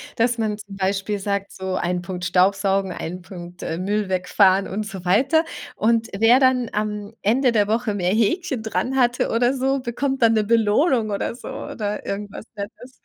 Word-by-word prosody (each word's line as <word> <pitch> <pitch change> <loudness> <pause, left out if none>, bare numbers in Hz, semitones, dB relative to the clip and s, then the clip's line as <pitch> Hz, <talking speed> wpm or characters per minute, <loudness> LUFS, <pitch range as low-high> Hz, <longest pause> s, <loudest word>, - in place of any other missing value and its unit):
dass 235 +1 +1
man 215 -1 -1
zum 205 -2 -10
Beispiel 195 +1 -1
sagt, 200 0 -2
so 190 0 -4
1 180 0 -1
Punkt 180 0 -5
Staubsaugen, 195 +1 +2
1 180 +1 -6
Punkt, 175 -1 -10
äh, 160 - -3
Müll 200 +2 -1
wegfahren 190 +1 +3
und 210 +2 -3
so 190 -4 -8
weiter. 275 - +3 0.3
Und, 230 +1 +2
wer 230 +4 +6
dann 255 -3 +3
am 210 0 -3
Ende 245 +4 +3
der 205 -3 +2
Woche 225 0 0
mehr 180 -3 0
Häkchen 240 - 0
dran 250 +4 -2
hatte 245 -1 +2
oder 245 +3 +2
so, 270 +1 0
bekommt 265 +2 -2
dann 225 - +6
'ne 215 -1 +2
Belohnung 225 +2 +2
oder 200 +3 -2
so 245 - -11
oder 210 -1 -4
irgendwas 205 +2 -5
Nettes. 220 +5 -9
210 Hz, 180 wpm, -22 LUFS, 195-240 Hz, 0.3 s, wer